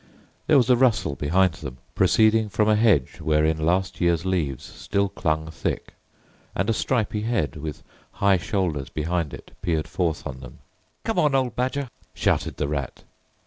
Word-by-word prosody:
There 150 - +6
was 125 -1 +4
a - - +7
rustle 120 - +2
behind 85 +6 +2
them, 65 -4 -7 0.2
proceeding 110 0 +3
from 105 +1 +1
a 110 - +5
hedge 105 - +2
wherein 80 0 +1
last 90 +4 0
year's 85 0 +2
leaves 80 -9 -1
still 100 0 -2
clung 80 -2 -1
thick, - - -4 0.6
and 95 - 0
a - - +2
stripy 110 -2 0
head, 105 - -1
with 75 0 -6 0.3
high 100 -1 +3
shoulders 85 - -2
behind 80 0 -2
it, - - -11
peered 80 -3 -1
forth 85 -4 -2
on 65 -1 -6
them. 65 -1 -11 0.5
"Come - - 0
on, 150 -3 +3
old 130 -4 +1
Badger!" 130 +2 -1 0.3
shouted - - 0
the 75 - -1
Rat. 70 -3 -4
90 Hz, 165 wpm, -24 LUFS, 75-110 Hz, 0.6 s, a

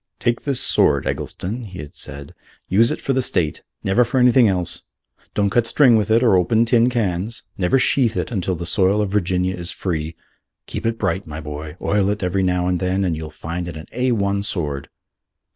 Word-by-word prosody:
"Take 120 0 -1
this 140 -3 0
sword, 70 -2 +3
Eggleston," 110 +7 -4
he 95 -3 -10
had 75 -3 -9
said, 70 +1 -7 0.3
"use 115 +5 +4
it - - -2
for 135 - -1
the 130 - +1
State; 85 - 0 0.2
never 100 +6 +3
for 125 +3 0
anything 125 -1 +5
else: 90 -4 0 0.5
don't 100 -1 +1
cut 120 0 +2
string 125 -1 +5
with 110 -1 +1
it 115 +3 +4
or 115 -6 +5
open 110 +6 +3
tin 120 +1 +3
cans. 110 -2 -2
Never 90 +7 +2
sheathe 125 -3 +2
it 115 - -2
till 90 +1 -1
the 85 +1 -5
soil 95 +3 +3
of 105 -2 -1
Virginia 95 -2 0
is 85 -1 -5
free. 80 -3 -3 0.5
Keep - - -4
it 115 0 -1
bright, 95 -3 -2
my 75 0 -6
boy: 75 +1 -7
oil 100 -1 +1
it 105 -1 -2
every 90 +2 0
now 90 -1 +1
and 90 -1 0
then, 95 +1 0
and 85 -3 0
you'll 80 0 -6
find 85 +3 -5
it 85 -2 -6
an 80 - -9
A 125 +1 0
1 100 -3 0
sword." 75 -9 -2
95 Hz, 210 wpm, -21 LUFS, 85-115 Hz, 0.5 s, anything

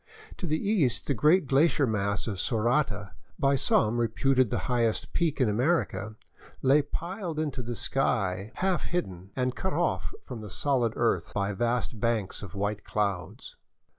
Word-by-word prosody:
To 180 - -4
the 155 0 +1
east 170 - +1
the 140 - +1
great 150 - +4
glacier 140 +2 +3
mass 100 -3 -1
of 100 -5 -4
Sorata, 115 -3 0 0.3
by 140 0 +3
some 120 -3 +2
reputed 125 +2 +2
the - - -1
highest 120 -3 0
peak 165 -4 0
in 130 - +4
America, 110 - 0 0.5
lay 135 +3 +5
piled 170 +3 -5
into 145 -4 -2
the 120 0 -4
sky, 105 -7 0
half 190 -1 0
hidden 95 - -3
and 125 -1 0
cut 190 - -2
off - - 0
from 115 - -7
the 105 - -8
solid 125 -2 +1
earth 115 -1 0
by 100 0 0
vast 120 +2 -1
banks 115 -4 -1
of 100 -2 -9
white 105 +1 -2
clouds. 100 -5 -3
120 Hz, 160 wpm, -28 LUFS, 105-145 Hz, 0.5 s, lay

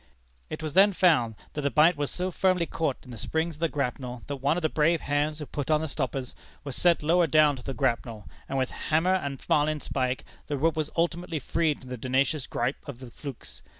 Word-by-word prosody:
"It - - -6
was 155 -2 -3
then 195 +3 +6
found, 150 - +3 0.2
that 150 - -3
the 140 - +1
bight 160 +4 +5
was 145 -1 -2
so 185 +1 -3
firmly 185 -1 +2
caught 160 -5 -1
in 125 - -12
the 115 - -8
springs 160 0 -2
of - - -19
the 165 0 +1
grapnel, 125 -3 -3
that 140 - -4
one 140 +5 +1
of 180 - -3
the - - +4
brave 160 +2 +2
hands 145 +1 0
who 150 - -5
put 145 0 -5
on 155 -1 +4
the 160 - -2
stoppers, 130 -3 -3 0.3
was 140 -4 -6
sent 175 -3 +3
lower 170 +2 +4
down 150 -1 +5
to 125 - -10
the 135 - -4
grapnel, 115 -6 -1 0.2
and 135 - -1
with 130 -1 0
hammer 165 +4 +1
and 140 -8 -2
marlinspike, 145 -4 0 0.2
the 145 - -2
rope 160 +3 +2
was 155 -1 -1
ultimately 170 0 0
freed 155 +2 0
from 130 - -12
the 125 - -5
tenacious 130 +3 0
gripe 125 +4 -1
of 140 -4 -6
the 125 -1 -11
flukes. 115 - -9
150 Hz, 225 wpm, -27 LUFS, 130-160 Hz, 0.3 s, then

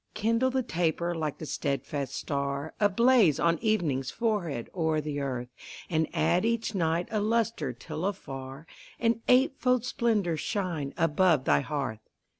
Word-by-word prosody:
Kindle 230 +4 +2
the 260 0 0
taper 170 -3 0
like 155 -3 -3
the 155 - -7
steadfast 140 -2 -3
star 140 +1 -3
Ablaze 210 - +4
on 170 0 +2
evening's 160 - 0
forehead 195 - -1
o'er 160 -3 +1
the 150 -1 -3
earth, 125 -3 -3 0.4
And 160 -1 +2
add 175 +3 +2
each 230 -1 0
night 170 -2 0
a 215 - +1
lustre 225 - 0
till 130 +7 -6
afar 135 -6 -6 0.3
An 230 0 +1
eightfold 250 -1 +3
splendor 215 -10 0
shine 170 -8 -3
above 165 -3 +3
thy 70 -1 +4
hearth. 135 - -3
170 Hz, 140 wpm, -28 LUFS, 145-220 Hz, 0.4 s, Ablaze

